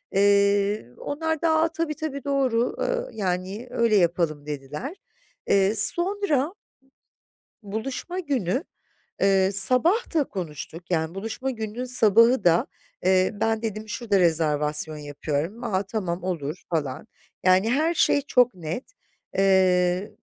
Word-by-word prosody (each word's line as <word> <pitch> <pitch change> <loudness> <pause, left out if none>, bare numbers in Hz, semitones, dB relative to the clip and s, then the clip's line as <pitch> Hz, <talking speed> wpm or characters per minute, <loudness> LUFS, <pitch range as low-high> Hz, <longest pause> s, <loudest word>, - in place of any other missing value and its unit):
Eee, 200 - +3
onlar 320 +1 -3
da 330 - +2
"A, 325 - +3
tabii, 330 -2 -2
tabii. 285 -2 -5
Doğru, 260 -4 0
ııı, - - -1
yani, 190 +3 -3
öyle 235 -3 +2
yapalım." 170 -5 +1
dediler. 150 - -6 0.5
Eee, 195 +2 +3
sonra 345 - +1 1.1
buluşma 255 - -5
günü, 265 - -1 0.6
eee, 195 0 +3
sabah 260 - +3
da 305 -3 +3
konuştuk. 165 - -7
Yani 160 -1 -1
buluşma 225 +6 -4
gününün 225 0 -5
sabahı 230 -1 +4
da, 170 -1 +4 0.4
eee, 185 0 +3
ben 225 +1 -1
dedim 215 -1 -4
"Şurada 210 -2 0
rezervasyon 155 -2 +1
yapıyorum.", 150 - -4
"A, 190 -1 0
tamam, 190 -4 -4
olur." 170 -3 -4
falan. 150 +1 -2 0.4
Yani 185 +4 +4
her 310 +7 +1
şey 285 - +3
çok 250 -4 +3
net. 175 - -5 0.5
Eee, 185 -1 +2
205 Hz, 120 wpm, -25 LUFS, 180-255 Hz, 1.1 s, sabahı